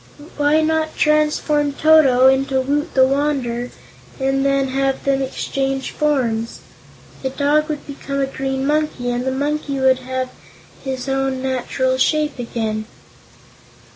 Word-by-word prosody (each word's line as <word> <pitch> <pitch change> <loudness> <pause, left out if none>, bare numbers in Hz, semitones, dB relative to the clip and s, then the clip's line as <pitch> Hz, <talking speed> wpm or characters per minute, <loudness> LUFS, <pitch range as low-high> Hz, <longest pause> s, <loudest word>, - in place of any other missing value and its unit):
Why 295 +2 +3
not 315 0 0
transform 300 -1 +2
Toto 285 -5 +5
into 265 0 +3
Woot 290 +5 -1
the 260 -1 +6
Wanderer, 260 -3 -1 0.5
and 270 0 +1
then 275 -1 +1
have 270 0 -1
them 275 -1 +1
exchange 270 0 -2
forms? 240 -7 -1 0.6
The 265 - -2
dog 295 +3 +1
would 300 -2 -4
become 275 -1 -5
a 275 - +2
green 270 0 -3
monkey 295 -4 0
and 245 +1 -2
the 265 - 0
monkey 285 +1 -2
would 260 -1 +3
have 260 0 -3 0.5
his 265 -1 -4
own 270 -1 -1
natural 260 0 -1
shape 305 -1 +1
again." 220 -2 -3
270 Hz, 135 wpm, -19 LUFS, 260-295 Hz, 0.6 s, the